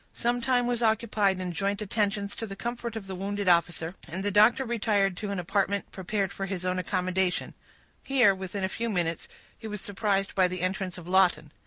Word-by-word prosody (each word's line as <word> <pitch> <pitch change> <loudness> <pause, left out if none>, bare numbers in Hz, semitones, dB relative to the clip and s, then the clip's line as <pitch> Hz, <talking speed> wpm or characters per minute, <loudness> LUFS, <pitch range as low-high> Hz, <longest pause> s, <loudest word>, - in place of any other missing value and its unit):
Some 240 +1 0
time 245 0 +2
was 240 -1 -1
occupied 220 -3 +2
in 185 -1 -3
joint 200 +4 -1
attentions 205 -1 -1
to 225 - -4
the 195 - -7
comfort 235 +2 -4
of 220 -3 -5
the 190 - -6
wounded 200 +1 -3
officer, 170 -1 +2
and 185 +4 -5
the 205 - +1
doctor 215 +6 +5
retired 210 -5 +1
to 210 0 -4
an 200 - -2
apartment 200 +3 -1
prepared 195 +1 -2
for 195 0 -4
his 185 -2 -4
own 185 0 0
accommodation; 185 0 -1 0.5
here, 250 -7 +4
within 190 +1 -5
a - - +2
few 230 +4 -3
minutes, 170 -5 -1 0.3
he 225 - -9
was 210 -1 -5
surprised 200 -1 -1
by 185 -2 +4
the 180 -1 -5
entrance 185 0 -2
of 175 -2 -10
Lawton. 180 -5 +3
195 Hz, 200 wpm, -28 LUFS, 185-215 Hz, 0.5 s, doctor